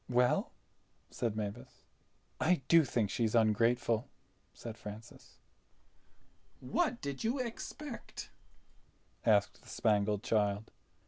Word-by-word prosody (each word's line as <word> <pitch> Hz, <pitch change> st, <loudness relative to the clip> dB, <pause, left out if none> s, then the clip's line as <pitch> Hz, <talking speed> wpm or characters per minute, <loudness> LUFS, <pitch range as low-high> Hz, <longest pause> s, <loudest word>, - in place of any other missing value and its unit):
"Well!" 125 Hz, 0 st, +3 dB, 0.6 s
said 115 Hz, -3 st, -2 dB
Mavis. 100 Hz, -, -6 dB, 0.5 s
"I 160 Hz, -3 st, +2 dB
do 165 Hz, -1 st, +7 dB
think 115 Hz, -6 st, 0 dB
she's 115 Hz, -1 st, 0 dB
ungrateful," 115 Hz, +1 st, +3 dB, 0.4 s
said 115 Hz, -2 st, -8 dB
Francis. 110 Hz, +2 st, -11 dB, 1.2 s
"What 305 Hz, -9 st, 0 dB
did 140 Hz, -2 st, -4 dB
you 235 Hz, +5 st, +1 dB
expect?" 255 Hz, +2 st, -6 dB, 1.0 s
asked 105 Hz, -2 st, +3 dB
the -, -, -16 dB
Spangled 105 Hz, -1 st, +1 dB
Child. 105 Hz, -3 st, +1 dB
115 Hz, 95 wpm, -33 LUFS, 105-140 Hz, 1.2 s, do